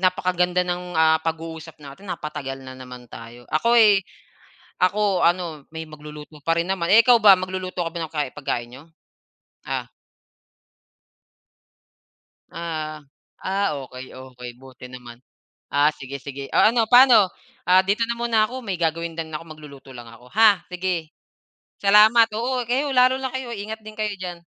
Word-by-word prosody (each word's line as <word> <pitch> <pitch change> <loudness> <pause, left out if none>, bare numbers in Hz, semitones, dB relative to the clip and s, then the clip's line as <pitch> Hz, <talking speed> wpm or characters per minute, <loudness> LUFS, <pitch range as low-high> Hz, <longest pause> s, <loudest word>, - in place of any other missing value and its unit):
napakaganda 180 -1 +1
ng, 180 0 -4
ah, 160 0 +4
pag-uusap 160 -1 -6
natin 145 +7 -13
napa-tagal 150 -6 -5
na 130 - -9
naman 125 -1 -11
tayo, 120 +1 -12
ako'y 215 +3 +5 0.8
ako 195 0 +2
ano, 170 -4 -1
may 160 0 -6
magluluto 150 0 -11
pa 165 +3 +1
rin 170 - 0
naman. 185 -3 -1
Eh, 215 +4 +8
ikaw 245 -1 +7
ba 195 -3 +8
mag-luluto 185 0 -5
ka - - -3
ba 170 - -7
ng 160 0 -7
kai 150 -3 -1
pagkain 120 -5 -4
n'yo? 130 +3 -12 0.8
Ah. - - -3 2.7
Ah, 155 -2 -5 0.4
ah, 195 +2 0 0.2
okay, 130 +1 -11
okay 125 -1 -10
buti 130 0 -13
naman. 125 -1 -12 0.5
Ah, 145 +1 +3
sige-sige. 140 -1 -8
Oh, - - +5
ano 225 0 +3
pano, 245 -4 +7 0.4
ah, 185 +1 +5
dito 205 +4 0
na 235 - -2
muna 235 -2 +1
ako, 255 +3 -8
may 195 -5 -4
gagawin 165 0 -2
din 160 -1 -5
ako 165 - -6
mag-luluto 140 -3 -14
lang 120 -2 -10
ako, 115 +2 -16
ha? 210 -4 +5
Sige. 180 -3 -3 0.7
Salamat. 215 +3 +6
Oo, 250 +3 -1
kayo, 275 +4 0
lalo 255 +1 +4
na 265 - -2
kayo 260 -2 -5
ingat 220 +1 -6
din 215 0 -11
kayo 215 -1 -2
diyan. 180 -2 -6
170 Hz, 155 wpm, -22 LUFS, 150-205 Hz, 2.7 s, Eh